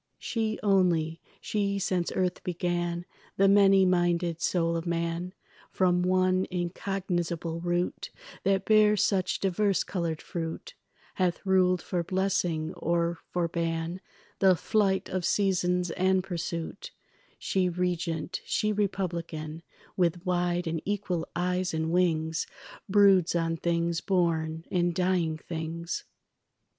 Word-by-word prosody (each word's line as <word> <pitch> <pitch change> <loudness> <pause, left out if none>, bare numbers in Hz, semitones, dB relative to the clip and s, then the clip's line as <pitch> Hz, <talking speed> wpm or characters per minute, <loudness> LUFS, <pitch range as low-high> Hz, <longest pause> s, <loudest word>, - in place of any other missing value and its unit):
She 220 -2 -2
only, 175 -5 +2 0.2
she 200 -2 -1
since 180 -2 -1
earth 180 -1 -1
began, 175 -1 -2 0.3
The 195 - +5
many 195 -1 +6
minded 175 -2 +1
soul 170 -2 +1
of 165 +1 -3
man, 170 +1 -2 0.4
From 180 -1 +2
one 185 +1 +2
incognizable 175 -2 -2
root 175 +1 -1 0.3
That 195 -1 +1
bears 210 -2 +5
such 190 -2 +1
divers 195 +1 +1
coloured 170 -4 -2
fruit, 170 - -5 0.4
Hath 180 0 -1
ruled 185 -1 +3
for 175 -2 -1
blessing 180 -3 0
or 170 0 -1
for 175 -1 0
ban 165 +1 -2 0.4
The 190 -2 +5
flight 195 +1 +1
of 185 -1 -2
seasons 180 -2 +1
and 185 +1 +2
pursuit; 170 -1 -5 0.5
She 185 -2 0
regent, 175 -1 -2
she 215 0 0
republican, 170 -6 -3 0.3
With 175 0 0
wide 175 -1 0
and 165 -1 -2
equal 185 -4 -2
eyes 180 0 0
and 160 0 -1
wings 165 -2 +1 0.4
Broods 195 -4 +5
on 165 -1 +1
things 170 0 0
born 165 -3 0
and 175 -1 +1
dying 180 -4 +1
things. 165 +1 -5
175 Hz, 120 wpm, -28 LUFS, 170-190 Hz, 0.5 s, many